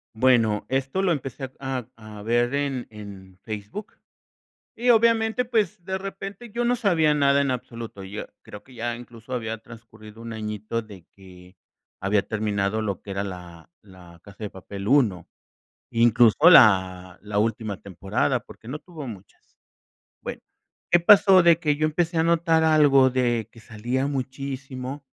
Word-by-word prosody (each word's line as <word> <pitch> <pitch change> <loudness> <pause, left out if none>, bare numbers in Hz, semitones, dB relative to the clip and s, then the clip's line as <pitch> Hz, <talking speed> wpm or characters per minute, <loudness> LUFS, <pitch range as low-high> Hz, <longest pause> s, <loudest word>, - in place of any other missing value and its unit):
Bueno, 115 -4 +3
esto 135 +7 -1
lo 185 -3 +2
empecé 135 -2 -4
a 130 -3 -4
a 110 -2 -11
ver 120 +3 +1
en 140 -3 -2
en 100 -3 -11
Facebook. 110 - -7 0.8
Y 245 +2 -2
obviamente, 230 +1 +3
pues, 215 -8 -1
de 190 0 -3
repente 195 +3 -8
yo 240 +3 -2
no 245 +1 +2
sabía 170 -9 +2
nada 140 -1 +3
en 140 - 0
absoluto. 115 -5 -6
Yo 100 +3 -6 0.2
creo 105 - -11
que 130 - -17
ya 120 0 -3
incluso 120 +1 -10
había 115 -2 -3
transcurrido 110 -1 -14
1 115 -1 -7
añito 110 +1 -4
de 100 -5 -14
que 90 -1 -16 0.4
había 100 +1 +1
terminado 105 -1 -1
lo 100 -4 -3
que 100 - -10
era 100 0 -2
la, 90 - -9
La 90 -4 -16
Casa 100 +2 -10
de 105 - -3
papel 100 +1 -8
1, 110 - +2 0.6
incluso 115 -1 +4
la 95 - +5 0.2
última 110 -1 -1
temporada, 100 - -1
porque 110 - -15
no 145 - -5
tuvo 155 -4 -10
muchas. 100 -4 -13 0.7
Bueno, - - -6 0.5
¿qué 175 - +5
pasó? 190 0 +7
De 170 -1 +5
que 150 -4 +1
yo 155 +1 0
empecé 165 +2 -1
a 160 - +3
notar 165 -1 +2
algo 145 -4 +5
de, 120 -4 0
que 115 - -16
salía 120 +5 -3
muchísimo. 135 0 -5
120 Hz, 155 wpm, -24 LUFS, 105-150 Hz, 0.8 s, pasó